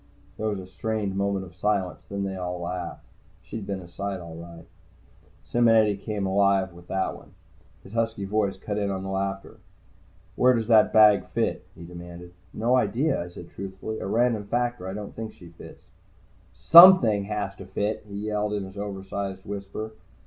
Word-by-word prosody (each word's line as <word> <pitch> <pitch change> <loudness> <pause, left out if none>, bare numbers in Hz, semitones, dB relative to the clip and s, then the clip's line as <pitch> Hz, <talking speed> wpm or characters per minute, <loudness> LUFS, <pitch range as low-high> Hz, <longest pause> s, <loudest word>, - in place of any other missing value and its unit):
There 110 - -3
was 105 -2 -2
a 95 - -8
strained 100 +1 -3
moment 100 -1 -1
of 90 - -14
silence, 95 0 -1
and 100 0 -3
then 95 - -3
they - - -6
all 90 0 -4
laughed. 90 +1 -5 0.4
She'd 110 -3 -7
been 95 -1 -3
a 90 - -11
sight, 100 +2 -4
all 85 -2 -9
right. 85 0 -11 0.8
Simonetti 115 -3 +4
came 105 0 -4
back 95 - 0
alive 95 -1 +2
with 85 0 -15
that 95 0 -1
one. - - -16 0.5
His 95 - -14
husky 115 -3 -1
voice 100 -1 0
cut 105 +2 -4
in 100 -1 -1
on 95 -1 -3
the 95 - -4
laughter. 95 +2 -3 0.8
"Where 125 0 +4
does 115 -1 -1
that 110 -2 +6
bag 105 -2 +6
fit?" - - -2
he 85 - -11
demanded. 85 0 -10 0.2
"No 120 +3 +2
idea," 125 - +1
I - - -9
said 85 0 -11
truthfully. 100 +3 -6
"A - - -4
random 115 0 +1
factor. 120 -2 -1
I 95 - -4
don't 105 -1 -7
think 110 -1 -6
she 85 - -14
fits." 85 - -14 0.7
"Something 165 - +8
has 105 -2 -3
to 95 - -9
fit!" 105 +3 -2
he 100 - -8
yelled 105 0 -1
in 100 -1 -2
his 95 +1 -9
oversized 95 -1 -5
whisper. 100 +2 -6
100 Hz, 185 wpm, -26 LUFS, 95-110 Hz, 0.8 s, Something